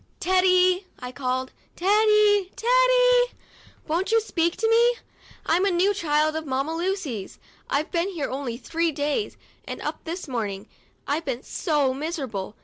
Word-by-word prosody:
"Teddy," 370 0 +3
I 250 0 -7
called, 255 0 -3 0.2
"Teddy! 415 0 +3
Teddy! - - +3 0.5
Won't 345 +7 -1
you 455 - +5
speak 340 -6 -1
to 450 - +1
me? 470 +2 +4 0.5
I'm 350 +3 +2
a 400 - +3
new 375 +3 +2
child 310 -4 +1
of 315 -1 -4
Mamma 270 +4 -1
Lucy's; 330 - -3 0.3
I've 295 +3 -1
been 345 +2 0
here 330 -7 -3
only 260 -3 -4
three 330 +5 -1
days, 295 +7 -2 0.3
and - - -7
up - - -4
to - - -37
this 340 +2 -5
morning 215 -5 -4 0.4
I've 305 +4 -2
been 260 -2 -3
so 295 -6 0
miserable. 265 - -4
335 Hz, 150 wpm, -24 LUFS, 275-400 Hz, 0.5 s, you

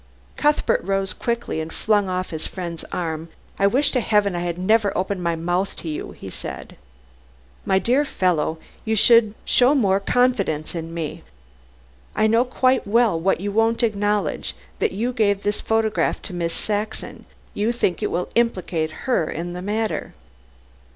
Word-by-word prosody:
Cuthbert 295 0 +2
rose 195 0 0
quickly 235 -9 -2
and 160 +1 -6
flung 205 -1 +1
off 185 0 -2
his 160 -1 -3
friend's 170 -3 -6
arm. 165 -2 -3 0.3
"I 200 - +5
wish 265 +8 +3
to 255 - +1
Heaven 210 -4 +2
I - - -1
had 175 -1 -2
never 205 +2 +3
opened 190 0 -1
my 170 -1 0
mouth 175 +4 -1
to - - -8
you," 155 - -4
he - - -9
said. - - -7 0.9
"My 190 - +4
dear 250 +8 +3
fellow, 175 - 0 0.3
you 220 0 0
should 220 0 +5
show 255 +4 +4
more 195 -7 +3
confidence 195 -9 +1
in 165 -1 -5
me. 165 -2 -4 0.9
I - - +3
know 225 +2 +4
quite 255 -1 +1
well 220 -5 +3
why 190 +4 +2
you 200 +3 -3
won't 225 +3 +2
acknowledge 210 -2 0 0.2
that 445 - +1
you 240 +4 -2
gave 205 -4 +1
this 205 0 -1
photograph 220 -1 +1
to 195 - -7
Miss 170 -1 -2
Saxon. 210 +1 -3 0.3
You 210 +3 0
think 190 -7 0
it - - 0
will 175 +1 -2
implicate 180 -9 0
her 240 -12 +1
in 175 +2 -4
the 180 - -5
matter." 215 +3 -2
200 Hz, 165 wpm, -22 LUFS, 175-225 Hz, 0.9 s, I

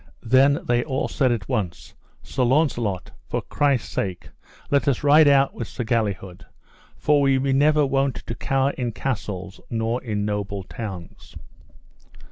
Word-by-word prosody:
Then 135 +4 +4
they 120 0 +1
all 135 -3 -2
said 130 -2 +1
at 115 -5 -2
once: 105 -10 -3 0.3
Sir - - -4
Launcelot, 120 - +1 0.2
for - - -2
Christ's 140 -5 0
sake 95 -3 -3 0.4
let 140 +1 +2
us 135 -4 +3
out - - -13
ride 145 -2 +6
with 115 - -5
Sir - - -5
Galihud, 105 -6 -2 0.5
for 145 -1 +3
we 135 -1 +3
be 135 0 0
never 150 +2 +4
wont 135 -1 +1
to - - -4
cower 135 +3 0
in 120 -4 -4
castles 100 -7 -4
nor 115 +1 -1
in 105 -4 -2
noble 100 -2 -3
towns. 95 -4 -8
125 Hz, 150 wpm, -23 LUFS, 105-140 Hz, 0.5 s, ride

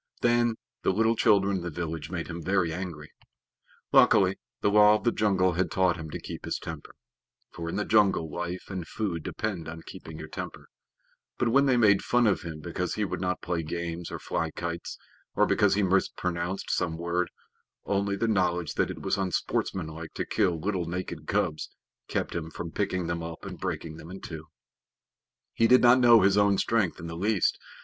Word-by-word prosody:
Then 120 -1 +3 0.3
the - - +1
little 115 +4 +2
children 100 -3 +3
in - - -4
the 85 - -4
village 80 0 -4
made 85 -2 -3
him 85 0 -6
very 90 -2 +1
angry. 85 -4 -6 0.8
Luckily, 95 0 +5 0.2
the 100 - +2
Law 105 0 +7
of 105 - -3
the 120 - +3
Jungle 95 -5 +2
had 90 +2 0
taught 95 -2 +2
him 80 -2 -7
to - - -5
keep - - -8
his - - -2
temper, - - -8 0.6
for 85 -1 -5
in - - -4
the 105 - -1
jungle 100 -6 +3
life 85 +3 -4
and 90 -4 -4
food 95 -6 -3
depend 95 -2 -4
on 80 +1 -7
keeping 80 -1 -9
your 80 0 -7
temper; - - -7 0.7
but 120 - +1
when 140 +4 +4
they 130 -2 +4
made 100 -4 +5
fun 120 0 +3
of 105 -3 +2
him 80 -4 -7
because - - -3
he - - 0
would - - -4
not 90 0 -2
play 85 -2 -1
games 85 +1 -4
or - - -5
fly 80 - -2
kites, 85 +1 -5 0.4
or - - +4
because 100 -1 +3
he 105 - +2
mispronounced 90 -1 -1
some 80 -2 0
word, 85 +1 -1 0.6
only 100 0 0
the 115 +3 0
knowledge 90 -6 +1
that - - +1
it - - -7
was 100 - 0
unsportsmanlike 85 -3 -2
to - - -2
kill 85 -3 +1
little 95 0 -1
naked 90 +2 -5
cubs 75 - -1 0.4
kept - - -2
him 80 -1 -4
from 85 +1 -6
picking 95 -2 -1
them 85 0 -2
up 80 0 -7
and - - -7
breaking 80 -1 -4
them 80 - -11
in 95 +1 -8
two. 80 -3 -8 1.1
He 115 - +3
did 125 +2 +6
not 120 +1 +7
know 120 -2 +7
his 100 +2 +4
own 100 -1 +4
strength 105 -6 +1
in 85 - -7
the 85 0 -6
least. 100 +2 +1
90 Hz, 195 wpm, -28 LUFS, 85-100 Hz, 1.1 s, Law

